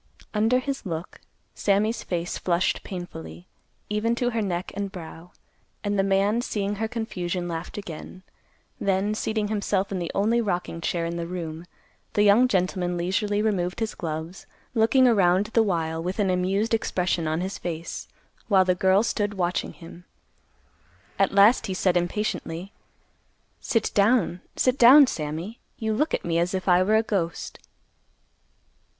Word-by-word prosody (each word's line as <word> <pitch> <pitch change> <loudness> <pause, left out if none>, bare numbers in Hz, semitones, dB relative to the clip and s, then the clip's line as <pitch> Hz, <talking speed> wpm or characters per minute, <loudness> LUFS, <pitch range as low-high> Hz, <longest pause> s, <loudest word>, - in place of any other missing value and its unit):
Under 225 +4 +3
his 270 +2 -3
look, 170 -4 -6 0.3
Sammy's 210 +3 +1
face 175 -1 -3
flushed 175 0 0
painfully, 85 - -8 0.4
even 215 +3 0
to 245 0 0
her 225 -1 -1
neck 180 -3 -3
and 200 0 -4
brow; 165 -1 -10 0.5
and 205 -1 0
the - - +6
man, 195 +4 +2
seeing 205 -3 -2
her 220 +2 -1
confusion, 185 -6 -3
laughed 170 +2 -5
again. 185 -1 -8 0.6
Then, 195 +1 +1
seating 215 -1 -1
himself 200 -2 -1
in 190 - -2
the 170 - -3
only 225 +4 +2
rocking 175 -5 -2
chair 170 0 -1
in 170 +1 -3
the 170 0 -3
room, 170 -1 -6 0.5
the 205 - +3
young 210 +5 +6
gentleman 180 -3 0
leisurely 205 +4 0
removed 185 -4 -1
his 220 -2 -2
gloves, 160 +2 -6 0.3
looking 235 +3 +4
around 190 -4 +4
the 230 - +5
while 165 -5 -1
with 180 +3 -3
an 200 -3 +2
amused 195 +5 0
expression 180 -6 0
on 160 +2 -1
his 190 +2 -4
face, 165 -1 -5 0.4
while 190 -4 +4
the 180 - +3
girl 190 +3 +3
stood 205 -3 -1
watching 180 -1 -1
him. 170 +1 -13 1.1
At 195 - +3
last, 200 +5 +5
he 190 - -3
said 185 -1 +1
impatiently, 175 0 -2 0.9
"Sit 225 -2 0
down, 200 -4 +2
sit 255 +1 +1
down, 270 +5 +9
Sammy. 165 - -5 0.2
You 220 -1 -1
look 300 +8 +1
at - - -6
me 170 -1 +1
as 175 +2 0
if 185 - -4
I 180 0 +5
were 210 +4 +3
a 220 - +4
ghost." 180 -6 -3
190 Hz, 155 wpm, -25 LUFS, 175-215 Hz, 1.1 s, down